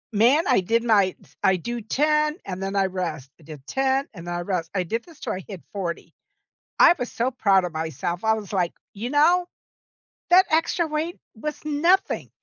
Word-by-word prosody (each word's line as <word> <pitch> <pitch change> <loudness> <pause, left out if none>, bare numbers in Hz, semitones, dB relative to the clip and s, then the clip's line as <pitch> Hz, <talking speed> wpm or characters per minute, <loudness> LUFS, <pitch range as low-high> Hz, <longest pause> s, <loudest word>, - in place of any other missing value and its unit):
Man, 255 +10 +5
I 250 -6 +4
did 230 +5 +1
my 205 -5 +4
t - - -37 0.3
I 190 - +4
do 235 +7 -4
10, 300 - +1
and 185 -1 -5
then 195 +1 -3
I 195 -1 +3
rest, 170 -8 -4
I - - -19
did 145 -3 -11
10, 270 +1 0
and 175 -3 -8
I 175 0 -2
rest. 175 -2 -2
I 185 - +1
did 225 +7 -3
this 335 -4 -17
till - - -3
I 185 -1 -6
hit 195 -5 -9
40. 180 -4 -4 0.6
I - - +8
was 245 - -3
so 250 +3 -1
proud 195 -6 +3
of 170 - -6
myself. 160 - -3
I 220 - +4
was 210 -2 -5
like, 180 -3 0 0.2
"You 225 +5 -5
know, 345 +5 +4 0.8
that 370 +2 +7
extra 330 +1 +2
weight 315 +3 -3 0.2
was 300 +7 -5
nothing. 335 +6 +1
220 Hz, 200 wpm, -24 LUFS, 180-295 Hz, 0.8 s, I